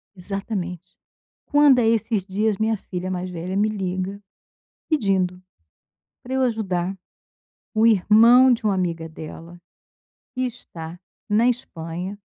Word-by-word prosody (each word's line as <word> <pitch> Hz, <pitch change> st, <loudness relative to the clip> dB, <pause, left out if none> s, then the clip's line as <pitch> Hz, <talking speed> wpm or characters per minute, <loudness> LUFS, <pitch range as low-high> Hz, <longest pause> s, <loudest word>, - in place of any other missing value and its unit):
Exatamente, 185 Hz, -2 st, -5 dB, 0.5 s
Quando 290 Hz, -3 st, +5 dB
é 225 Hz, -, +3 dB
esses 225 Hz, -3 st, +1 dB
dias, 205 Hz, +2 st, 0 dB
minha 220 Hz, +1 st, +1 dB
filha 185 Hz, -1 st, -5 dB
mais 185 Hz, 0 st, -3 dB
velha 175 Hz, +2 st, -5 dB
me 210 Hz, +2 st, +3 dB
liga 190 Hz, -1 st, -3 dB, 0.7 s
pedindo 190 Hz, -, +1 dB, 0.8 s
para 260 Hz, +2 st, -5 dB
eu 265 Hz, -, +1 dB
ajudar 195 Hz, -6 st, -1 dB, 0.8 s
o 220 Hz, +1 st, +4 dB
irmão 230 Hz, +5 st, +6 dB
de 235 Hz, -1 st, -1 dB
uma 205 Hz, -2 st, +2 dB
amiga 170 Hz, -3 st, -2 dB
dela, 165 Hz, +2 st, -10 dB, 0.8 s
que 255 Hz, -, -3 dB
está 175 Hz, -9 st, -6 dB, 0.3 s
na 220 Hz, +3 st, +3 dB
Espanha. 180 Hz, -5 st, -4 dB
195 Hz, 125 wpm, -23 LUFS, 180-225 Hz, 0.8 s, irmão